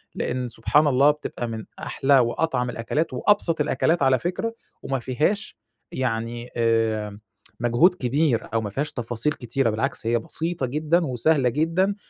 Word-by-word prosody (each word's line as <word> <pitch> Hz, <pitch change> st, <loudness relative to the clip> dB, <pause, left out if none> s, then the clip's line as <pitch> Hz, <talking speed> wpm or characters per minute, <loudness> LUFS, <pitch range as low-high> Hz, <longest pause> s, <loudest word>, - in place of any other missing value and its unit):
لأن 125 Hz, 0 st, -2 dB
سبحان 135 Hz, +6 st, +2 dB
الله 140 Hz, +2 st, +5 dB
بتبقى 150 Hz, -4 st, -5 dB
من 110 Hz, -1 st, -6 dB
أحلى 135 Hz, 0 st, +2 dB
وأطعم 125 Hz, +1 st, 0 dB
الأكلات 120 Hz, +7 st, -2 dB
وأبسط 165 Hz, +1 st, +2 dB
الأكلات 160 Hz, +1 st, +1 dB
على 130 Hz, -1 st, +4 dB
فكرة 205 Hz, -, -3 dB, 0.3 s
وما 135 Hz, -1 st, -2 dB
فيهاش 150 Hz, -, -1 dB, 0.3 s
يعني 120 Hz, -1 st, -3 dB
آآ، 110 Hz, -3 st, 0 dB, 0.4 s
مجهود 120 Hz, +10 st, +3 dB
كبير 130 Hz, -4 st, 0 dB
أو 115 Hz, -, +2 dB
ما 105 Hz, -, -4 dB
فيهاش 145 Hz, +7 st, -2 dB
تفاصيل 120 Hz, +5 st, -1 dB
كتيرة 120 Hz, 0 st, -1 dB
بالعكس، 110 Hz, +1 st, -2 dB
هي 120 Hz, +1 st, +2 dB
بسيطة 165 Hz, +4 st, -3 dB
جدًا 155 Hz, +6 st, +1 dB
وسهلة 130 Hz, +1 st, +2 dB
جدًا، 165 Hz, -, +1 dB
130 Hz, 145 wpm, -24 LUFS, 115-155 Hz, 0.4 s, الله